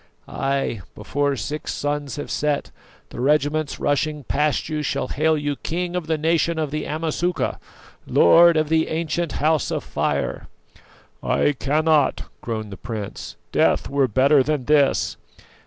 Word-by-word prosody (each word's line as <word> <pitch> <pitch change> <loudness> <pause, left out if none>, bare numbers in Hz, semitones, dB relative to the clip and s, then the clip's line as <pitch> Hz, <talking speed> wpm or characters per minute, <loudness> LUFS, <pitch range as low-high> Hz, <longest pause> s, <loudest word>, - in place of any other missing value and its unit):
Ay, 135 -6 -2
before 145 0 -1
six 150 +4 -4
suns 145 -1 -3
have 145 - -6
set, 150 -1 -1 0.4
the - - -6
regiments 150 +2 +1
rushing 150 +1 0
past 150 +3 0
you 155 -1 -2
shall 140 -3 -2
hail 155 +2 +1
you 145 -1 -2
King 175 +2 -3
of 175 -3 -3
the 160 -1 +1
Nation 165 +1 +1
of 155 -3 -2
the 155 0 -3
Amasuka, 165 +3 -1 0.5
Lord 170 - +6
of 155 -1 +1
the 160 0 +2
ancient 165 -1 -2
House 155 -2 +1
of - - -2
Fire!" - - -2 0.7
"I - - +2
cannot," 150 +3 +1 0.2
groaned 110 -3 -4
the 100 - -8
prince; 110 -4 -6 0.2
"death - - +2
were 140 -1 +2
better 135 +5 +4
than 145 -1 -1
this!" 145 -1 +2
150 Hz, 145 wpm, -22 LUFS, 140-160 Hz, 0.7 s, Lord